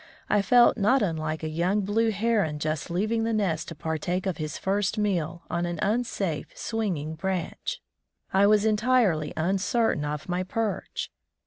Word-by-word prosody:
I 205 - +4
felt 240 +4 +5
not 240 +6 +3
wilike 155 -3 -2
a - - -1
young 175 +6 +1
blue 220 +3 +1
heron 205 -7 +1
just 155 -1 -2
leaving 215 +6 0
the 225 0 0
nest 190 -7 0
to 165 - -7
partake 160 +4 -2
of 190 -3 -1
his 155 -1 -4
first 200 +2 0
meal 175 -5 -1
on 175 0 -1
an 175 0 -3
unsafe, 205 -7 -1
swinging 185 -9 -2
branch. 185 +2 -3 0.5
I 195 +1 +5
was 210 0 +4
entirely 215 -8 +2
uncertain 195 +2 +1
of 150 0 -4
my 180 0 -1
perch. 210 +3 -3
190 Hz, 155 wpm, -26 LUFS, 160-215 Hz, 0.5 s, felt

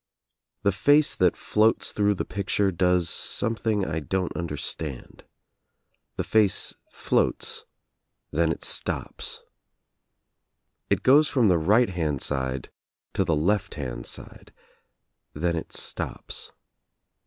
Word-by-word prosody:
The 100 - +3
face 145 +10 +4
that 90 -2 +2
floats 110 +1 +2
through 105 -1 +1
the - - -3
picture 100 0 0
does 90 -1 +2
something 110 +2 0
I 80 -1 -2
don't 90 +4 -2
understand. 75 -4 -4 0.9
The - - -2
face 105 -4 +2 0.2
floats, - - 0 0.7
then 80 +1 +2
it - - -5
stops. - - -1 1.5
It 100 0 +1
goes 145 +4 +6
from 120 -6 +3
the 90 -2 +3
right 105 +9 +3
hand 80 -6 -1
side 65 -2 -2 0.4
to 95 - +1
the 85 -4 +1
left 100 +6 0
hand 60 -5 -5
side, - - -6 0.8
then 85 +3 0
it 80 - -5
stops. - - -3
90 Hz, 115 wpm, -25 LUFS, 80-105 Hz, 1.5 s, goes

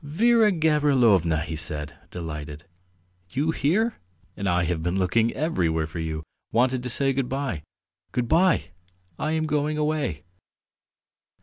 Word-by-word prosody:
"Vera 215 +8 +4
Gavrilovna!" 135 - +3
he 80 +1 -4
said, 75 -2 -2 0.2
delighted. 75 -3 -6 0.7
"You 150 - 0
here? 190 - +1 0.4
And 100 -1 -2
I 90 0 +2
have 85 -1 -1
been 90 +3 -1
looking 110 +5 +2
everywhere 85 - 0
for 80 +2 -7
you; 80 -1 -3 0.3
wanted 125 +1 +2
to 125 - -4
say 135 +2 +1
good 130 -1 -1
bye.... 135 - -2 0.5
Good 125 -1 -1
bye; 180 - +3 0.5
I 155 +1 -1
am 160 0 0
going 150 0 0
away!" 150 - -1
125 Hz, 135 wpm, -25 LUFS, -, 0.7 s, Vera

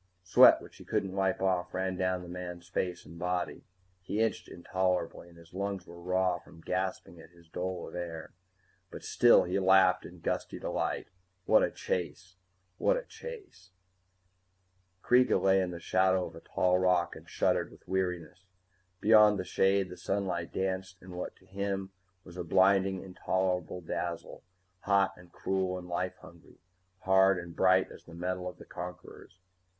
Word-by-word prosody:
Sweat 90 - +7
which - - -14
he - - -12
couldn't 95 -1 -2
wipe 95 -1 0
off 90 -2 0
ran 95 0 -1
down 95 0 -1
the - - -10
man's 90 -1 -7
face 90 0 -3
and 85 +1 -12
body. 90 0 -2 0.4
He 100 +3 -3
itched 115 0 0
intolerably, 90 0 -2
and 85 - -18
his 85 0 -17
lungs 100 -1 -3
were 85 0 -12
raw 90 0 +1
from 85 - -17
gasping 90 -1 -3
at 80 - -14
his 85 -1 -21
dole 90 +1 -4
of - - -11
air. 85 -2 -6 0.6
But - - -10
still - - +5
he 90 +2 -1
laughed 95 -1 +5
in 90 0 -11
gusty - - -2
delight. - - -2 0.4
What - - +5
a - - +2
chase! 95 +1 -4 0.4
What - - +3
a - - -4
chase! 425 - -11 1.3
Kreega 125 +1 +4
lay 95 0 +4
in 90 - -1
the 85 -1 -6
shadow 95 +1 +2
of 80 - -10
a - - -9
tall 90 +2 +1
rock 90 -2 +2
and - - -13
shuddered - - +1
with - - -19
weariness. 90 -1 -3 0.5
Beyond 105 -1 +6
the 95 - -2
shade, 95 +1 +2
the 90 - -9
sunlight 95 -4 -2
danced 95 -1 -3
in 90 - -11
what 90 - -5
to - - -24
him 95 0 -3 0.3
was 90 - -12
a 90 - -3
blinding, 95 +2 +3
intolerable 90 -1 -2
dazzle, 85 0 -5 0.4
hot 100 0 +2
and 90 -1 -17
cruel 95 0 -1
and 90 -1 -8
life 90 +1 -2
hungry, - - -16 0.4
hard 95 0 +4
and 85 -1 -7
bright 95 0 +4
as - - -13
the 85 - -12
metal 90 +1 -3
of - - -12
the - - -13
conquerors. 90 0 -9
90 Hz, 170 wpm, -30 LUFS, 90-95 Hz, 1.3 s, Sweat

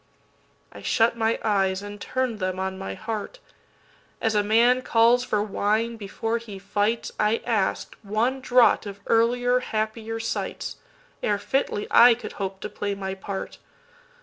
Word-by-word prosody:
I - - -11
shut 230 0 +2
my 225 0 +1
eyes 195 -2 +1
and 205 0 -8
turn'd 255 -4 -2
them 185 -1 -2
on 190 0 -2
my 195 - -5
heart. 215 - -5 0.8
As 225 -2 0
a 210 - +3
man 235 +4 +4
calls 235 +1 +4
for 210 -4 0
wine 215 +3 0
before 225 +2 -3
he 215 -4 -9
fights,I 210 +2 -1
ask'd 215 -5 0
one 225 +6 -1
draught 250 -4 +4
of 200 0 -8
earlier, 245 +2 +3
happier 220 -1 -3
sights, 225 - -4 0.4
Ere 205 - +1
fitly 210 -2 -1
I 235 0 +8
could 240 - -8
hope 190 0 -4
to - - -3
play 205 0 -3
my 190 -1 -4
part. 195 0 -6
220 Hz, 150 wpm, -25 LUFS, 200-235 Hz, 0.8 s, I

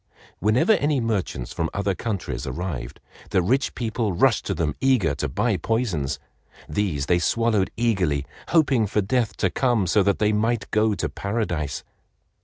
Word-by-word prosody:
Whenever 110 - +3
any 145 -7 +1
merchants 100 - -2
from 80 -1 -1
other 100 0 0
countries 100 -1 -4
arrived, 85 -6 -4 0.3
the - - +2
rich 130 +9 +1
people 115 -3 -1
rushed 85 - +2
to - - -1
them 75 -4 -1
eager 125 - +3
to 70 - -3
buy - - 0
poisons. 105 - -1 0.5
These 75 -4 -1
they 85 +3 +3
swallowed 110 0 +1
eagerly, 95 - +1 0.2
hoping 135 -9 +3
for 105 +2 +1
death 110 +2 0
to - - +1
come 120 -7 +1
so 100 +4 +3
that 100 +1 +2
they 105 0 +2
might 115 +1 0
go 110 0 +2
to 85 - -1
Paradise. 85 - -3
105 Hz, 160 wpm, -24 LUFS, 85-115 Hz, 0.5 s, Whenever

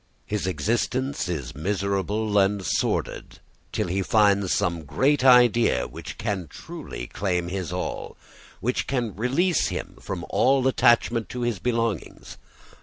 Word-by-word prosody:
His 105 -3 -2
existence 120 +4 -1
is 70 -8 -4
miserable 100 +5 -1
and 100 0 +1
sordid - - -1 0.3
till - - -1
he 95 +3 -1
finds 100 -2 +3
some 85 -2 0
great 130 - +1
idea 120 - +5
which - - -9
can 100 -6 -3
truly - - -8
claim 90 +3 -2
his 90 -3 -4
all, - - -4 0.4
which 125 +5 -1
can 120 -7 -2
release 140 - +1
him - - -5
from - - -5
all 135 0 +3
attachment 120 -2 +3
to 125 - -5
his 120 -5 -1
belongings. 115 -5 -2
105 Hz, 130 wpm, -25 LUFS, 95-120 Hz, 0.4 s, idea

